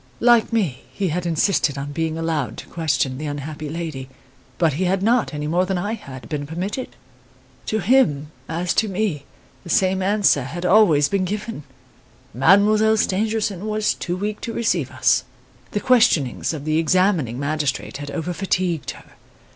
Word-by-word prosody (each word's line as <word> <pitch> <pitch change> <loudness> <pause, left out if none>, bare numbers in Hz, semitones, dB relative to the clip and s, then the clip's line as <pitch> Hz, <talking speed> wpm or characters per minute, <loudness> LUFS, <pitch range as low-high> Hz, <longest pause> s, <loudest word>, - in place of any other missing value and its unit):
Like 240 -1 +4
me, 180 - 0
he 195 -3 -2
had 175 +2 -2
insisted 165 -3 +1
on 140 +1 -4
being 160 +1 -2
allowed 160 -8 -2
to - - -8
question 140 -5 -1
the 155 - -4
unhappy 145 +1 -5
lady; 155 -5 -5 0.5
but 165 -4 +2
he 180 +7 -1
had 190 +1 0
not, 235 +2 +2
any 150 -1 -4
more 170 +4 +1
than 185 0 -1
had 175 - -5
I, - - -11
been 145 -2 -4
permitted. 185 - -4 0.7
To 220 - 0
him, 175 - +2 0.2
as 170 +2 -1
to 220 - +3
me, 190 -7 -2 0.4
the 175 - -11
same 190 +2 +2
answer 200 -6 +3
had 175 +7 -5
always 180 -7 +5
been 195 -1 0
given: 205 -4 -5 0.7
Mademoiselle 210 - +4
Stangerson 215 -1 -1
was 215 0 +1
too 175 0 -4
weak 210 +2 -3
to 230 - -4
receive 180 - 0
us. 130 0 +2 0.5
The 205 - -2
questionings 220 - +3
of 150 -3 -6
the 155 +1 +1
examining 165 - +1
magistrate 145 -2 -2
had 145 0 -7
over 165 +4 -3
fatigued 180 -5 -1
her. - - -18
175 Hz, 165 wpm, -21 LUFS, 150-205 Hz, 0.7 s, always